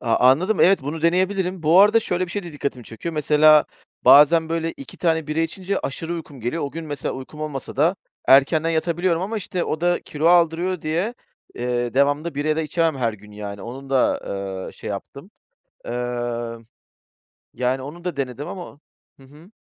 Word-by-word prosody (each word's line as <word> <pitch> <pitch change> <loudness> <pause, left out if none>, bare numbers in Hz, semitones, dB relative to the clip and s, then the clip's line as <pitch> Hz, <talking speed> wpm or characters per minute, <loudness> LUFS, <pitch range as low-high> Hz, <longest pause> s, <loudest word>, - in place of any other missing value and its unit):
A 115 -2 +1
anladım, 185 +11 +1
evet. 190 -3 +5
Bunu 150 +3 -5
deneyebilirim. 185 +1 +1
Bu 165 +4 +6
arada 210 +3 +6
şöyle 185 -3 -1
bir - - -11
şey 205 +2 -3
de 170 - -9
dikkatimi 140 -4 -4
çekiyor. 160 +10 -6
Mesela, 150 0 +5 0.4
bazen 160 +3 +7
böyle 165 0 -2
2 135 -5 -11
tane 160 -3 +1
bira 155 +1 -1
içince, 185 +4 -2
aşırı 165 +5 -4
uykum 155 -5 -8
geliyor. 120 +9 -2
O 140 - -4
gün 165 +2 -6
mesela 145 -3 -4
uykum 135 +3 -9
olmasa 150 -3 -5
da, 165 +7 +3 0.3
erkenden 155 +5 +5
yatabiliyorum. 170 +1 0
Ama 215 +4 -3
işte, 180 -3 -3
o 155 - -3
da 175 0 +1
kilo 150 +2 -3
aldırıyor 175 +1 +3
diye, 170 +9 -1 0.4
eee, 120 -1 -2
devamlı 145 +4 +1
bira 150 +2 0
da 160 - 0
içemem. 160 -1 0
Her 120 -3 0
gün 105 0 -14
yani, 100 -1 -7
onun 135 +3 -8
da, 135 -2 +2
ııı, 95 -1 -5
şey - - -7
yaptım. - - -8 0.6
Iıı, 120 -1 -3 0.9
yani 125 +1 -1
onu 160 +6 -9
da 180 -4 -3
denedim 135 +1 -4
ama 175 -6 -9 0.4
Hı - - -16
hı. 150 +7 -17
155 Hz, 180 wpm, -22 LUFS, 130-170 Hz, 0.9 s, bazen